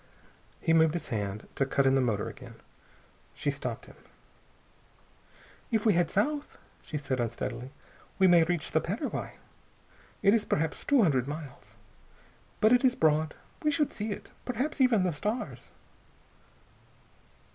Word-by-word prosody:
He 165 - +2
moved 160 0 +4
his 170 - -4
hand 105 -2 -3
to - - +1
cut 135 0 +1
in 135 - +4
the 135 - +4
motor 110 -5 0
again. - - -10 0.8
She - - -1
stopped - - -5
him. - - -16 1.7
"If 220 -1 0
we 215 - +5
head 170 -1 +2
south," 290 +9 -1 0.2
she 155 - -5
said 135 -3 -2
unsteadily, 120 +2 -3 0.5
"we 190 - +4
may 175 -2 +7
reach 165 -1 -2
the 160 - +2
Paraguay. 205 - -4 0.9
It 200 - +6
is 225 -2 +3
perhaps 160 -5 -1
two 280 -5 +4
hundred 135 -8 +2
miles, 140 -7 -8 0.9
but 215 +3 +6
it 245 - +4
is 255 -1 +4
broad. 155 -3 +2 0.3
We 305 - +2
should 300 -1 +1
see 215 +1 -4
it. - - -7
Perhaps 265 +4 -2
even 235 -7 +4
the 180 -2 0
stars...." 210 +11 -4
165 Hz, 145 wpm, -29 LUFS, 140-225 Hz, 1.7 s, may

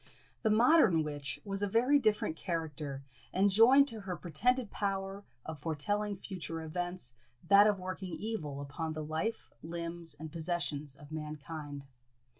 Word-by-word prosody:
The 220 - +2
modern 225 - +6
witch 145 -2 -3
was 195 -1 -2
a 205 - +2
very 250 +8 +4
different 210 - +1
character, 155 -5 -3 0.3
and 195 +2 +3
joined 255 +7 +7
to 225 -2 -5
her 190 -3 -4
pretended 235 - +1
power 195 0 -2 0.2
of 160 -2 -6
foretelling 205 +7 -1
future 165 -4 -6
events 175 -4 -3 0.4
that 200 +1 +8
of 205 -2 +3
working 185 -1 -5
evil 155 -11 -4
upon 155 +3 -4
the 155 0 -4
life, 160 +9 -3
limbs, 170 -1 -5
and 155 +1 -8
possessions 160 -4 -2
of 145 +1 -14
mankind. 150 -2 -6
175 Hz, 145 wpm, -33 LUFS, 155-205 Hz, 0.4 s, that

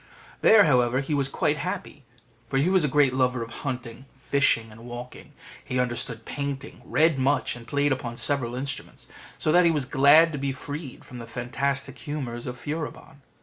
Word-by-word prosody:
There, 220 -2 +7
however, 125 -4 +3
he 140 +2 -3
was 140 -2 +1
quite - - 0
happy, - - -5 0.4
for 135 - 0
he 155 +7 +2
was 190 -3 +4
a - - +3
great 140 -2 +3
lover 125 -2 +1
of 115 - -9
hunting, 125 -1 -5
fishing, 130 -5 +1
and 115 +1 -13
walking: 120 +1 -9 0.3
he 130 - -2
understood 120 -2 -1
painting, 140 0 -5
read 160 -3 +2
much, 135 +1 +1
and 115 -1 -12
played 145 +3 +1
upon 125 -3 -3
several 125 -4 +1
instruments; 135 +1 -6 0.3
so 155 - 0
that 175 +2 +6
he 170 - +5
was 150 -5 0
glad 145 +5 +6
to 150 - -4
be 135 0 -1
freed 145 +1 -8
from 125 - -10
the 115 - -8
fantastic 135 +3 -3
humours 130 -6 -5
of 125 0 -5
Furibon. 150 0 -6
135 Hz, 185 wpm, -26 LUFS, 125-145 Hz, 0.4 s, There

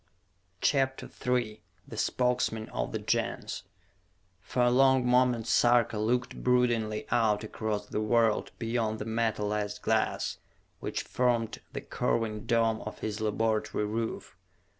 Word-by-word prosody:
CHAPTER 135 -2 +1 0.2
III 120 -4 0 0.3
The - - -8
Spokesmen 125 -3 0
of - - -3
the - - -1
Gens - - -2 0.7
For 125 - -1
a 120 - +4
long 130 0 +4
moment 125 -2 +3
Sarka 120 -2 +3
looked 120 +4 -1
broodingly 120 -4 +2
out 110 -3 +2
across 105 -1 -3
the 105 - -3
world 115 0 +2
beyond 115 -2 -1
the 105 - -5
metalized 105 -2 -1
glass - - 0 0.4
which - - -3
formed 120 -3 0
the - - -4
curving 110 0 -1
dome 115 -2 +2
of 110 - -7
his 110 0 -3
laboratory 110 0 0
roof. 110 +2 -4
115 Hz, 125 wpm, -29 LUFS, 110-125 Hz, 0.7 s, a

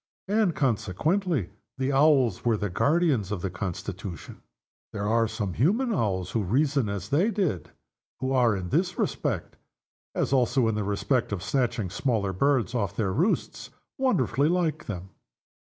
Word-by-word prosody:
And 205 -4 +2
consequently 135 - 0 0.3
the 135 +1 0
Owls 135 - +4
were 115 -2 +2
the 105 -2 -3
guardians 140 - +2
of 100 -4 -3
the 95 - -2
Constitution. 95 0 -6 0.5
There 105 -1 -2
are 115 +1 +3
some 105 -4 -3
human 220 - +2
owls 95 - -1
who 115 - 0
reason 135 - +1
as 100 -1 -4
they 170 +10 +3
did, 185 - -1
and - - -25 0.5
who 130 +1 -2
are, 120 -5 +3
in 90 -2 -4
this 180 - 0
respect - - -2 0.6
as - - 0
also 125 -1 +3
in 110 - 0
respect 105 +5 0
of 95 -3 -3
snatching 120 -4 -1
smaller 105 -4 0
birds 135 +5 +1
off 115 -5 -1
their 100 -4 0
roosts 175 - -1 0.3
wonderfully 150 - +2
like 175 -3 0
them. 95 -2 -6
120 Hz, 155 wpm, -27 LUFS, 100-150 Hz, 0.6 s, Owls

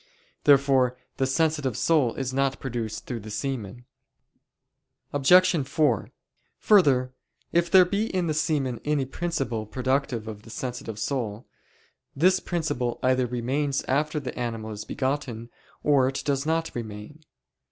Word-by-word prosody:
Therefore 135 -3 +4 0.2
the 135 - +1
sensitive 150 -4 0
soul 150 -8 +2
is 130 -1 -3
not 135 0 0
produced 115 -4 -4
through 120 -3 -4
the 110 0 -9
semen. 120 0 -4 1.3
Obj. 165 +1 +4
4: 150 +1 +1 0.5
Further, 135 -11 +4 0.4
if 170 0 +2
there 185 -1 +7
be 200 +4 -1
in 185 -4 -1
the 160 - 0
semen 150 -5 -1
any 150 -2 0
principle 135 -7 -3
productive 130 -1 -1
of 105 -2 -7
the 115 - -15
sensitive 120 -2 -5
soul, 115 -1 -3 0.7
this 185 +6 +4
principle 140 -9 -2
either 130 -1 +2
remains 135 +4 -1
after 150 +3 0
the 130 -4 -6
animal 115 -3 -4
is 105 0 -6
begotten, 130 -4 -3 0.3
or 140 -3 +4
it 135 - -3
does 140 0 0
not 165 0 0
remain. 110 +6 -8
135 Hz, 135 wpm, -26 LUFS, 120-150 Hz, 1.3 s, there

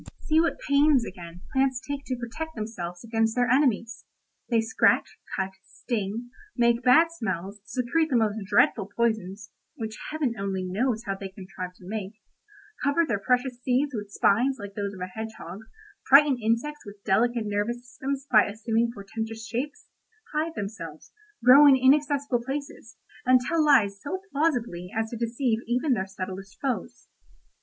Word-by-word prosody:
"See 315 0 +3
what 335 - 0
pains, 280 -3 +4
again, 175 -1 -9
plants 265 -2 +2
take 280 +1 -6
to 255 - -1
protect 250 +7 -6
themselves 180 -6 -5
against 225 -1 0
their 245 -1 +2
enemies. 240 -3 +1 0.5
They 230 -2 +3
scratch, 225 0 +2 0.2
cut, 190 0 -2
sting, 230 +2 -4 0.3
make 235 0 +3
bad 315 +7 +5
smells, 205 - -4
secrete 260 +8 0
the 265 - +1
most 220 -2 +2
dreadful 200 0 +3
poisons 220 -4 -1 0.2
(which 220 -1 -6
Heaven 300 -6 -1
only 195 -1 -2
knows 220 +5 -1
how 195 - -1
they 195 0 -7
contrive 185 -1 -8
to 180 - -16
make), 205 -1 -4 0.7
cover 285 +4 +3
their 205 - 0
precious 250 +3 0
seeds 260 +3 +1
with 205 -3 -5
spines 245 +7 +2
like 205 -1 -7
those 200 0 -4
of 185 - -10
a - - -1
hedgehog, 205 -2 -7 0.5
frighten 275 -1 +7
insects 235 +7 -1
with 205 0 -12
delicate 230 +3 +2
nervous 220 +4 -2
systems 270 +3 -4
by 215 -3 +7
assuming 225 +2 0
portentous 225 +1 -6
shapes, 265 +6 -4 0.5
hide 315 +2 -1
themselves, 195 -7 -7 0.3
grow 275 +5 +9
in 275 - +8
inaccessible 280 -1 +3
places, 275 -2 -6 0.3
and 255 0 +5
tell 315 +6 +1
lies 205 -9 +4
so 370 +6 -4
plausibly 240 - -1
as 225 0 -1
to - - -4
deceive 235 0 0
even 250 +4 +1
their 190 -4 -1
subtlest 190 0 -7
foes. 265 -3 -4
230 Hz, 155 wpm, -26 LUFS, 205-265 Hz, 0.7 s, grow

